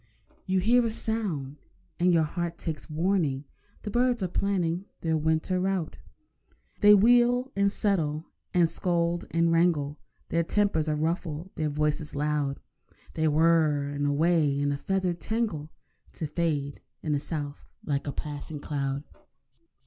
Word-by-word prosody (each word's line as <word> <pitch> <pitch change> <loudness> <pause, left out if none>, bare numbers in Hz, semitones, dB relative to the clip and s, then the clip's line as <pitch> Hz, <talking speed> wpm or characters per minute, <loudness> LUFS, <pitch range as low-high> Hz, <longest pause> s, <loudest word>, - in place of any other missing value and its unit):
You 190 0 +2
hear 240 +6 +4
a 230 - +1
sound, 195 -12 -3 0.4
and 180 +1 +4
your 165 -2 +4
heart 170 +2 -3
takes 160 -2 -5
warning— 155 -4 0 0.4
The 210 - -4
birds 245 -1 +2
are - - +1
planning 180 -1 -1 0.2
their 160 -1 +1
winter 160 +4 +1
route. 185 -3 -1 0.8
They 210 0 +8
wheel 245 +4 +4
and 200 0 +3
settle 165 -8 0 0.3
and 175 -2 +4
scold 170 0 0
and 165 0 +2
wrangle, 165 -4 +2 0.3
Their 170 - +2
tempers 170 -3 +1
are 150 - +1
ruffled, 165 +2 -2
their 155 -2 -1
voices 150 0 -1
loud; 145 -1 -1 0.5
Then 160 -1 +1
whirr—and 150 -3 +2
away 150 -1 +2
in 145 0 +1
a - - 0
feathered 185 -1 -1
tangle, 215 -10 -2 0.4
To 160 - -4
fade 150 -2 -2 0.2
in 155 - -1
the 145 - +2
south 145 -1 -5 0.2
like 140 -1 -1
a - - 0
passing 150 +1 -6
cloud. 140 -1 -2
165 Hz, 140 wpm, -28 LUFS, 150-185 Hz, 0.8 s, They